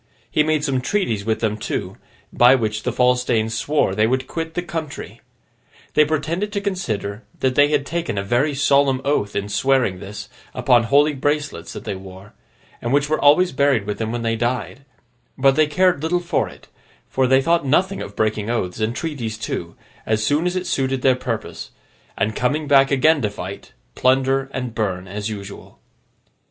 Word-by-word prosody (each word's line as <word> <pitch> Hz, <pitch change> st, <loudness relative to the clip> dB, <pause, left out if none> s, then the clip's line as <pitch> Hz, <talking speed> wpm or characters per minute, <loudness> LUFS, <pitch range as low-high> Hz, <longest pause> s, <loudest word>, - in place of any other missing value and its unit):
He -, -, +3 dB
made 155 Hz, -1 st, +1 dB
some 135 Hz, -3 st, 0 dB
treaties 120 Hz, -, -1 dB
with 110 Hz, -1 st, -1 dB
them 110 Hz, -2 st, 0 dB
too, -, -, -4 dB, 0.4 s
by 125 Hz, +2 st, +6 dB
which 110 Hz, -3 st, -1 dB
the 125 Hz, -, -1 dB
false 125 Hz, +1 st, +2 dB
Danes 115 Hz, -2 st, 0 dB
swore 115 Hz, -2 st, +1 dB
they 110 Hz, +2 st, +2 dB
would 130 Hz, +2 st, 0 dB
quit 165 Hz, +3 st, -5 dB
the 175 Hz, -, -1 dB
country. 160 Hz, -4 st, -6 dB, 0.7 s
They 150 Hz, -, +5 dB
pretended 165 Hz, +7 st, -2 dB
to 200 Hz, -, 0 dB
consider 115 Hz, -, -3 dB, 0.2 s
that 130 Hz, -1 st, +2 dB
they 145 Hz, +2 st, +5 dB
had 145 Hz, -2 st, 0 dB
taken 170 Hz, -8 st, -3 dB
a 100 Hz, -, -1 dB
very 130 Hz, +8 st, +1 dB
solemn 140 Hz, -1 st, +3 dB
oath, 120 Hz, -8 st, 0 dB
in 100 Hz, 0 st, -1 dB
swearing 125 Hz, -4 st, +1 dB
this 100 Hz, +2 st, -8 dB, 0.3 s
upon 120 Hz, -1 st, +4 dB
the 115 Hz, -, -4 dB
holy 145 Hz, +5 st, +4 dB
bracelets 145 Hz, -, -2 dB
that -, -, -8 dB
they -, -, -3 dB
wore, 95 Hz, +1 st, -11 dB, 0.5 s
and 120 Hz, -, -2 dB
which 145 Hz, +1 st, +2 dB
were 155 Hz, -, +2 dB
always 155 Hz, +6 st, +5 dB
buried 135 Hz, -6 st, +2 dB
with 105 Hz, 0 st, -4 dB
them 110 Hz, -1 st, -2 dB
when 120 Hz, 0 st, -3 dB
they 115 Hz, 0 st, 0 dB
died; 125 Hz, +3 st, -3 dB, 0.5 s
but 135 Hz, 0 st, +4 dB
they 155 Hz, -1 st, +4 dB
cared 180 Hz, 0 st, +2 dB
little 170 Hz, +3 st, +1 dB
for 175 Hz, -, -1 dB
it, -, -, -16 dB, 0.4 s
for 130 Hz, -1 st, +1 dB
they 130 Hz, +1 st, +5 dB
thought 165 Hz, +4 st, +2 dB
nothing 185 Hz, +8 st, +1 dB
of 100 Hz, -, -8 dB
breaking 110 Hz, 0 st, -1 dB
oaths 110 Hz, -5 st, -2 dB
and 110 Hz, +2 st, -1 dB
treaties 130 Hz, -9 st, -4 dB
too, 85 Hz, -6 st, -5 dB, 0.3 s
as 110 Hz, 0 st, +1 dB
soon 150 Hz, +8 st, +2 dB
as 180 Hz, -, -2 dB
it 185 Hz, 0 st, -2 dB
suited 135 Hz, -5 st, -1 dB
their 130 Hz, -2 st, +5 dB
purpose, 115 Hz, -3 st, -5 dB, 0.5 s
and 110 Hz, +2 st, 0 dB
coming 145 Hz, +4 st, 0 dB
back 135 Hz, -1 st, +5 dB
again 145 Hz, +2 st, +3 dB
to 105 Hz, -, 0 dB
fight, 100 Hz, -1 st, -8 dB, 0.2 s
plunder, 135 Hz, +1 st, +2 dB
and 125 Hz, -3 st, -4 dB
burn, 95 Hz, -5 st, -2 dB
as 105 Hz, +2 st, -4 dB
usual. 100 Hz, -2 st, -9 dB
130 Hz, 190 wpm, -21 LUFS, 110-150 Hz, 0.7 s, by